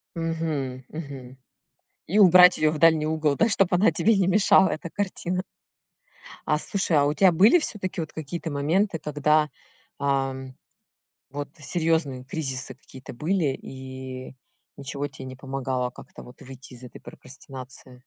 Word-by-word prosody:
Мгм, 160 -6 -3
мгм. 135 -5 -9 0.7
И 200 +5 +1
убрать 180 -2 +8
её 155 0 +2
в 155 - -4
дальний 160 -1 +4
угол, 155 -2 0
да, 225 - +2
чтоб 195 -3 +2
она 200 +6 +4
тебе 225 -1 +2
не 190 -2 +2
мешала, 190 0 +5
эта 160 +2 -5
картина. 185 -2 -3 1.1
А 150 - +2
слушай, 185 -1 0
а 145 - +4
у 145 - +1
тя 190 +2 +5
были 210 - +5
всё-таки 185 - -3
вот 155 - -7
какие-то 160 +1 -5
моменты, 165 +5 0
когда, 150 +1 +1 0.5
ам, 135 -2 -2 0.8
вот 145 +1 -5
серьёзные 160 -4 -1
кризисы 130 -4 -4
какие-то 130 0 -12
были, 155 0 0
и 130 -1 -9 0.4
ничего 140 +1 -5
те 140 -2 -11
не 130 0 -8
помогало 130 -2 -3
как-то - - -13
вот 125 - -15
выйти 130 0 -12
из 120 - -13
этой 120 - -12
прокрастинации? 130 -1 -12
150 Hz, 145 wpm, -25 LUFS, 130-170 Hz, 1.1 s, убрать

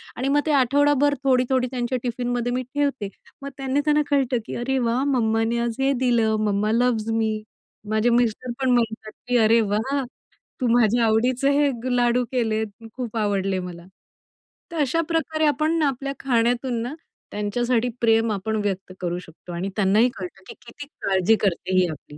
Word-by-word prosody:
आणि 255 +3 -2
मग 290 +1 +3
ते 310 - +1
आठवडाभर 285 +2 +3
थोडी, 255 -2 +3
थोडी 255 -1 +2
त्यांच्या 250 0 -1
टिफिनमध्ये 245 0 -2
मी 255 +1 -1
ठेवते 270 -5 -2 0.3
मग 280 - -5
त्यांनी 270 0 -1
त्यांना 300 0 +3
कळतं 270 -4 +2
की - - -6
"अरे 265 +3 -1
वाह! 240 +1 0
मम्माने 230 -4 +1
आज 235 -1 -1
हे 270 +1 +2
दिलं 230 -3 +2
मम्मा 210 +1 +1
लव्हज 230 -1 +1
मी." 220 -1 0 0.5
माझे 215 +2 +2
मिस्टर 240 +1 +1
पण 265 -1 +1
म्हणतात 220 -3 0 0.2
की 245 - 0
"अरे 225 +1 +5
वाह 220 +7 -1 0.6
तू 250 - +2
माझ्या 235 0 +3
आवडीचं 250 +5 +2
हे 260 -4 +1
लाडू 245 0 +2
केले 220 -4 0 0.3
खूप 240 -3 -5
आवडले 195 -3 0
मला." 175 -1 -8 0.9
तर 335 - -5
अशा 295 +4 +1
प्रकारे 320 -1 0
आपण 310 +3 +1
आपल्या 275 -1 -1
खाण्यातून 240 -1 0
ना, 245 +4 -4 0.4
त्यांच्यासाठी 235 +4 0
प्रेम 225 -1 +3
आपण 210 +2 -2
व्यक्त 190 -2 -3
करू 175 -1 -2
शकतो 175 0 -12
आणि 180 +3 -3
त्यांनाही 210 +4 +3
कळतं 185 +1 -8
की - - -7
किती 280 +5 -10
काळजी 190 +2 +3
करते 185 0 -1
ही 180 - +3
आपली. 150 -1 -10
240 Hz, 170 wpm, -23 LUFS, 215-260 Hz, 0.9 s, अरे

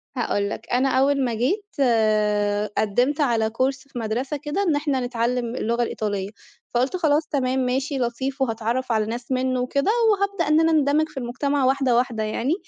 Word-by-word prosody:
هاقول 205 -5 -1
لك، - - -7
أنا 255 +2 +2
أول 270 +1 +2
ما 240 - -1
جيت 300 - 0
آآ، 210 -4 +2
قدِّمت 245 +8 +1
على 230 -5 +2
كورس 265 +4 -2
في 255 - -7
مدرسة 245 +6 -2
كده 295 +7 -2
إن 335 -6 +2
إحنا 290 -2 0
نتعلّم 240 0 -1
اللغة 235 0 0
الإيطالية، 205 -4 -3 0.4
فقُلت 255 +8 +1
خلاص، 310 -2 +2
تمام، 265 -2 0
ماشي، 265 +3 -1
لطيف 260 +3 -2
وهاتعرّف 235 +1 -1
على 220 -1 +2
ناس 240 +3 -6
مِنُّه 255 0 0
وكده 280 +9 +1 0.2
وهابدأ 400 -4 0
إن 305 +1 +4
أنا 325 0 +3
أندمِج 305 0 +2
في 305 - -16
المجتمع 270 +3 -1
واحدة، 265 -2 +2
واحدة 235 -3 0
يعني. 230 +7 -1
255 Hz, 175 wpm, -23 LUFS, 230-285 Hz, 0.4 s, إن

